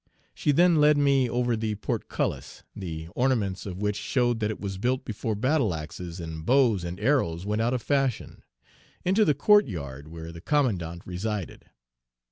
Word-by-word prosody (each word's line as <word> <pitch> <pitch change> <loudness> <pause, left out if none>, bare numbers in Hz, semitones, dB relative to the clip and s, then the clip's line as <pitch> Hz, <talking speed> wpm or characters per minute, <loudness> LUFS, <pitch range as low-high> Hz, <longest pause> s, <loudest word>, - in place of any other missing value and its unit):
She 150 - +1
then 175 +3 +5
led 150 0 +5
me 140 -3 +3
over 120 0 +1
the 110 -1 -2
portcullis, 105 - -3
the 80 -3 -6
ornaments 105 -5 0
of 90 -2 -5
which 105 0 -1
showed 120 +1 0
that 105 -1 0
it 110 - -4
was 95 -2 -5
built 130 +4 0
before 110 0 -3
battle 130 - +1
axes 85 +3 -7
and 80 -1 -6
bows 120 - +3
and 85 +2 -5
arrows 100 - +1
went 105 +2 0
out 120 +3 +1
of 125 - -4
fashion, 135 -4 -1 0.6
into 195 +4 +4
the 150 -7 +3
court 205 +5 +5
yard 70 - -6
where 80 +1 -8
the 85 0 -10
commandant 90 - 0
resided. 95 +1 -4
110 Hz, 170 wpm, -27 LUFS, 90-130 Hz, 0.6 s, then